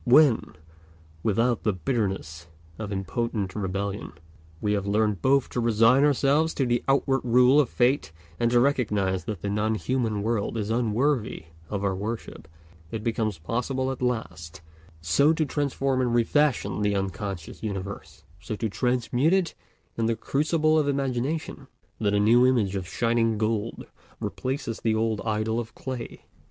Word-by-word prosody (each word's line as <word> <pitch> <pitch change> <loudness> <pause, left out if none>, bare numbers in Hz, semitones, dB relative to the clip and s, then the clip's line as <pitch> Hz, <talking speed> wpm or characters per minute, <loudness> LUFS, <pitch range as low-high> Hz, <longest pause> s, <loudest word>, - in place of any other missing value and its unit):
When, 135 -1 +4 0.7
without 115 +4 +1
the 105 - +1
bitterness 95 - -3 0.3
of 105 -2 -5
impotent 100 0 -2
rebellion, 100 0 -3 0.5
we 105 +3 0
have 100 -1 -1
learnt 105 -2 +1
both 135 0 +3
to - - -3
resign 115 +3 +4
ourselves 145 +2 +2
to 135 - +1
the 120 -1 0
outward 135 -1 +2
rule 125 +3 +5
of 145 - +3
Fate 120 - +1 0.3
and 120 - +2
to 120 0 +4
recognize 105 - +1
that 105 -6 -5
the 100 - -1
non 110 +2 0
human 110 -3 -1
world 115 0 -1
is 105 0 -2
unworthy 115 - 0 0.3
of 100 -1 -3
our 100 -1 +1
worship, 105 -4 -5 0.4
it 110 +2 -5
becomes 110 -4 -1
possible 125 - -2
at 130 - -6
last 110 -11 -3 0.4
so 140 - +3
to 160 -1 0
transform 135 -2 0
and 120 -2 +1
refashion 130 -1 +1
the 105 -1 +1
unconscious 95 -2 -4
universe, 100 -2 -6 0.2
so 110 +1 -5
to 110 +1 -2
transmute 125 - +1
it 190 -3 +1 0.5
in 115 - +2
the 115 - +1
crucible 155 +6 +1
of 150 - 0
imagination, 135 +1 -2 0.3
that 105 -2 +1
a - - +3
new 120 +4 +5
image 110 -7 +1
of 95 -2 -3
shining 115 +2 +1
gold 110 +1 -2 0.3
replaces 130 -3 -3
the 110 -1 +1
old 110 -1 0
idol 110 +1 0
of 115 -1 -7
clay. 130 -3 -6
115 Hz, 155 wpm, -26 LUFS, 105-130 Hz, 0.7 s, rule